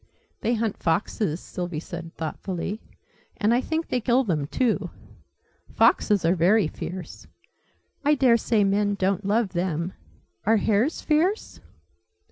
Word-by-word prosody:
"They 235 - 0
hunt 220 -2 -2
foxes," 170 0 0
Sylvie 175 -4 -5
said, 165 0 -8
thoughtfully. 185 +5 -4 0.6
"And 220 0 +2
I 245 - +3
think 320 +4 -2
they 250 - 0
kill 250 +3 +3
them, 155 - -1
too. 240 - 0 0.9
Foxes 205 -5 +3
are 170 - +4
very 190 +4 +4
fierce. 180 +1 -7 0.8
I 295 +1 +4
daresay 235 -5 +3
men 205 +1 +1
don't 195 +1 0
love 210 +1 +2
them. 175 -1 -2 0.5
Are 220 +2 +4
hares 220 +8 +1
fierce?" 340 +8 0
205 Hz, 125 wpm, -25 LUFS, 175-235 Hz, 0.9 s, are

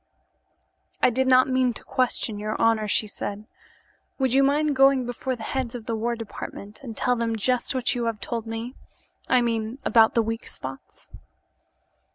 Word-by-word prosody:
"I - - +6
did 260 +2 +1
not 255 0 +6
mean 255 -2 +1
to - - -10
question 240 -4 -1
your 215 +1 -3
honor," 225 -2 +3
she 210 - +2
said. 205 0 -5 0.7
"Would 265 -3 +1
you 270 - +5
mind 290 +1 +2
going 270 -1 +5
before 250 +2 -3
the 230 - -9
heads 255 0 -3
of 230 -3 -7
the 230 - -2
war 235 +2 -1
department 215 -2 -8
and 230 -6 -8
tell 250 +5 +2
them 230 -1 -1
just 250 +5 0
what 255 -2 +1
you 240 -1 -2
have 225 -2 -2
told 230 -1 -4
me? 225 +2 -5 0.6
I 255 -1 +5
mean 230 0 -1
about 225 -2 +5
the 230 - +4
weak 225 +1 -4
spots." 130 +1 -9
235 Hz, 180 wpm, -25 LUFS, 225-255 Hz, 0.7 s, I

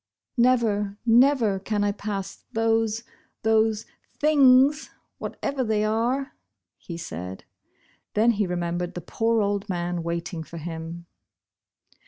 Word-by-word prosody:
" - - -61
Never, 210 -5 +1
never, 235 -4 +4
can 205 +1 -1
I 205 - +2
pass 200 -2 -5
those 225 0 +1 0.2
— - - -42
those 220 0 +2 0.2
— - - -40
things 285 0 +5 0.2
— - - -51
whatever 275 -2 -3
they 215 -2 +1
are," 240 +6 0 0.5
he 170 - -7
said. 90 - -7 0.7
Then 225 +3 +5
he 205 -3 0
remembered 175 0 -2
the 175 - -4
poor 225 +6 +1
old 200 +1 -1
man 175 -1 -2
waiting 170 0 -3
for 170 +1 -9
him. 165 +1 -6
210 Hz, 135 wpm, -25 LUFS, 175-230 Hz, 0.7 s, things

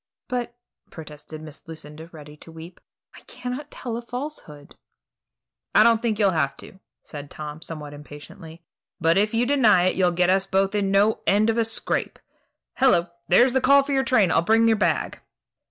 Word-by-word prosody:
"But," 245 -1 -4 0.3
protested 155 0 -11
Miss 155 +1 -11
Lucinda, 160 0 -9
ready 150 -2 -12
to 165 - -13
weep, 165 +2 -12 0.3
"I - - -14
cannot 255 +4 -7
tell 235 -2 -6
a - - -5
falsehood." 240 - -8 1.0
"I - - +7
don't 230 -1 +3
think 225 -3 -1
you'll 200 -2 +3
have 140 -5 -1
to," 190 - -14 0.2
said 145 -2 -9
Tom, 150 +1 -8
somewhat 150 -3 -8
impatiently; 150 +3 -12 0.4
"but 165 0 +2
if 210 +3 +1
you 235 +2 +2
deny 235 -9 +4
it, 185 - +1
you'll 185 -2 +2
get 180 +1 +2
us 190 0 +1
both 195 +1 0
into 200 -2 0
no 200 +3 +2
end 215 +3 +3
of 230 - -2
a - - +3
scrape. 225 0 -2 0.6
Hello! 175 -11 +3 0.2
there's 245 +8 +4
the 265 - +1
call 280 +2 +5
for 280 - -6
your 270 0 +2
train. 215 -9 +2
I'll - - +3
bring 225 +6 +3
your 225 - +4
bag." 210 - -1
195 Hz, 185 wpm, -23 LUFS, 160-235 Hz, 1.0 s, I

